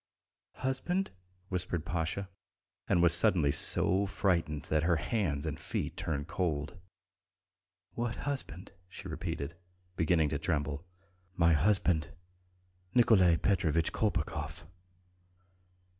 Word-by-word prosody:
"Husband?" 175 +9 -1 0.4
whispered 90 -3 -2
Pasha, 85 +4 -2 0.6
and 90 -3 +3
was 85 -1 +6
suddenly 85 -4 +4
so 95 +6 +2
frightened 85 -7 0
that 80 0 0
her 85 +2 +2
hands 80 -4 -1
and 80 0 -4
feet - - -3
turned 75 -1 -3
cold. 80 -3 -2 1.2
"What 120 -1 -2
husband?" 130 - -4 0.2
she - - -9
repeated, 70 +4 -4 0.4
beginning 80 -2 +2
to 70 - -2
tremble. 75 -2 -2 0.5
"My 85 -2 +4
husband,... 85 -1 +2 0.9
Nikolay 95 -8 +5
Petrovitch 85 -5 +1
Kolpakov." 75 +1 -2
85 Hz, 100 wpm, -31 LUFS, 75-95 Hz, 1.2 s, was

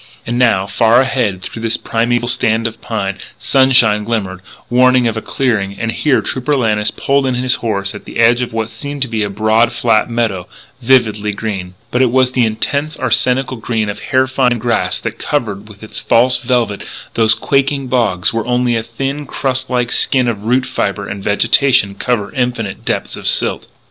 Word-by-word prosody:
And 120 +1 -2
now, 110 -6 +3
far 115 +4 +3
ahead 120 -8 0
through 115 - -7
this 115 0 0
primeval 120 +1 -1
stand 115 -2 +1
of 115 - -4
pine, 100 -5 -3 0.2
sunshine 120 -6 +3
glimmered, 105 -5 -3 0.3
warning 125 0 +4
of 115 - -2
a 110 - -3
clearing. 105 -8 -1
And 115 0 -1
here 140 +2 +1
Trooper 130 +3 -1
Lannis 105 -5 +1
pulled 140 -1 0
in 130 - 0
his 125 0 +1
horse 100 -4 -2
at 105 - -10
the - - -8
edge 120 +2 +4
of 125 - -3
what 115 0 -3
seemed 140 +4 -4
to - - -4
be 110 -2 -2
a 105 - -1
broad, 110 +3 +2
flat 115 -1 +1
meadow, 110 -6 -2 0.3
vividly 110 -4 +2
green. 95 -4 -5 0.2
But 125 - +1
it 130 - +4
was 130 +1 +2
the 125 -3 +2
intense, 140 +7 -2
arsenical 130 +1 +1
green 110 -2 -2
of 105 - -5
hair 130 0 +1
fine 130 -2 +1
grass 120 +1 -1
that - - -5
covers 105 -8 -2
with 105 0 -14
its 110 - -4
false 125 +2 +3
velvet 120 -5 -1 0.3
those 110 -1 +3
quaking 140 0 0
bogs 115 -9 0
where 115 0 -2
only 125 -1 +1
a 115 - 0
thin, 135 +5 -5
crust 130 -1 -1
like 125 -1 -1
skin 130 -2 +2
of 110 -3 -3
root 125 +3 +2
fibre 100 -5 -2
and 100 0 -6
vegetation 115 +1 +3
cover 105 0 -2
infinite 125 -5 -2
depths - - -2
of - - -4
silt. - - +1
115 Hz, 190 wpm, -15 LUFS, 105-130 Hz, 0.3 s, warning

